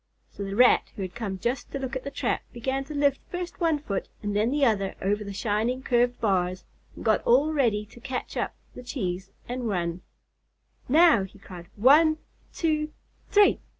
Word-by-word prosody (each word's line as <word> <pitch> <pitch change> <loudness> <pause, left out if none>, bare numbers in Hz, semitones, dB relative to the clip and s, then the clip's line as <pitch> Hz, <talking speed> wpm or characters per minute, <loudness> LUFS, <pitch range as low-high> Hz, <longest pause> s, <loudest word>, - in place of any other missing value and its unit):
So 200 - -6
the 195 0 -4
Rat 250 +2 +5
who 200 - -4
had 185 - -6
come 210 -5 -4
just 240 +8 -3
to - - -3
look 265 -1 -4
at 260 - -3
the 280 - -4
trap, - - -1
began 265 +3 -2
to 300 +2 -7
lift 285 -1 +2
first 355 0 -5
one 325 -3 +3
foot 210 -10 -4
and 205 -1 -2
then 215 +4 +2
another 225 -9 +1
over 205 +2 0
the 200 - -6
shining 220 +5 -1
curved 245 -1 +2
bars, 185 -4 0 0.3
and - - -10
got 220 -1 +3
all 280 +6 +3
ready 225 -8 +1
to 220 - -16
catch 250 +1 -5
up - - -2 0.2
the - - -9
cheese 195 -7 -4 0.2
and 245 -1 -3
run. 175 -2 -2 0.9
"Now!" 310 - +6
he 190 +2 -10
cried. 180 -3 -11
"One, 300 +8 +5 0.3
two, 305 -2 0 0.4
three!" 410 0 +5
240 Hz, 185 wpm, -26 LUFS, 200-280 Hz, 0.9 s, Now